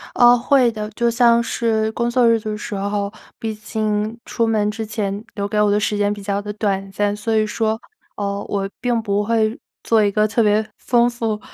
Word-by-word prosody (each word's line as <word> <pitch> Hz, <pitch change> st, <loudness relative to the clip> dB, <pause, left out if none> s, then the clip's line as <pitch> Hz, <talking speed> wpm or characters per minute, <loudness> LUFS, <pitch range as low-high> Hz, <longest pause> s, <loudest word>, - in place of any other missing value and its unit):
呃， 245 Hz, 0 st, +7 dB
会 250 Hz, -1 st, +3 dB
的， 215 Hz, -1 st, -5 dB
就 235 Hz, +2 st, +1 dB
像 235 Hz, 0 st, +4 dB
是 220 Hz, -2 st, 0 dB
工 235 Hz, +1 st, -1 dB
作 245 Hz, -1 st, +3 dB
日 230 Hz, -1 st, +4 dB
的 215 Hz, 0 st, -4 dB
时 210 Hz, -, -5 dB
候， 200 Hz, 0 st, -2 dB, 0.3 s
毕 220 Hz, -1 st, -3 dB
竟 215 Hz, +1 st, -2 dB
出 230 Hz, -, 0 dB
门 215 Hz, -2 st, +1 dB
之 220 Hz, +1 st, -5 dB
前 210 Hz, -1 st, -3 dB
留 200 Hz, -1 st, -2 dB
给 210 Hz, +1 st, -1 dB
我 210 Hz, -, +3 dB
的 205 Hz, +1 st, +3 dB
时 210 Hz, 0 st, 0 dB
间 205 Hz, 0 st, +1 dB
比 205 Hz, -, -8 dB
较 200 Hz, 0 st, -2 dB
地 210 Hz, 0 st, -5 dB
短 195 Hz, -2 st, -2 dB
暂， 205 Hz, +1 st, 0 dB
所 220 Hz, +2 st, -2 dB
以 215 Hz, 0 st, +3 dB
说， 220 Hz, +1 st, -1 dB, 0.4 s
呃， 200 Hz, 0 st, -3 dB
我 195 Hz, -1 st, -1 dB
并 240 Hz, -2 st, +1 dB
不 205 Hz, -1 st, 0 dB
会 220 Hz, 0 st, +1 dB, 0.2 s
做 220 Hz, -2 st, +3 dB
一 205 Hz, -, +2 dB
个 215 Hz, +1 st, +2 dB
特 220 Hz, +2 st, +1 dB
别 215 Hz, 0 st, +2 dB
丰 240 Hz, 0 st, +2 dB
富 225 Hz, -3 st, -2 dB
215 Hz, 230 characters per minute, -20 LUFS, 205-230 Hz, 0.4 s, 呃